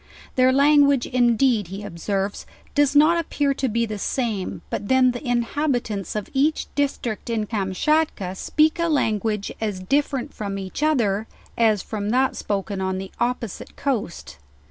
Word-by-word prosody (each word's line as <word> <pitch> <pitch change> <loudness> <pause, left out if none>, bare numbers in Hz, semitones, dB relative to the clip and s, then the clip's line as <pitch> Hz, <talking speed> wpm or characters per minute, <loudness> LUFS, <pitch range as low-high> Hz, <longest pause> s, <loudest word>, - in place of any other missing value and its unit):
Their 255 0 +5
language 280 -1 +4
indeed 240 -3 +2
he 195 +3 -7
observes, 195 +2 -3 0.3
does 290 -1 +2
not 315 +4 +6
appear 290 -3 0
to 265 -1 -1
be 230 +1 +1
the 215 -2 -5
same, 220 -5 -2
but 200 - -3
then 260 +1 +4
the 245 - -7
inhabitants 240 - -1
of 210 -2 -3
each 290 +3 +1
district, 260 -6 -2
in 225 -2 0
Kamschatka 205 +1 0
speak 310 - +1
a 335 - +2
language 215 -8 0
as 210 -4 -2
different 275 +6 -1
from 200 -2 -4
each 190 +6 -6
other, 225 -9 +1 0.3
as 220 -4 +2
from 210 -2 -4
that 260 +3 +2
spoken 200 -1 -3
on 190 0 -1
the 190 0 -6
opposite 240 -4 -3
coast. 210 - -3
235 Hz, 150 wpm, -23 LUFS, 200-275 Hz, 0.3 s, not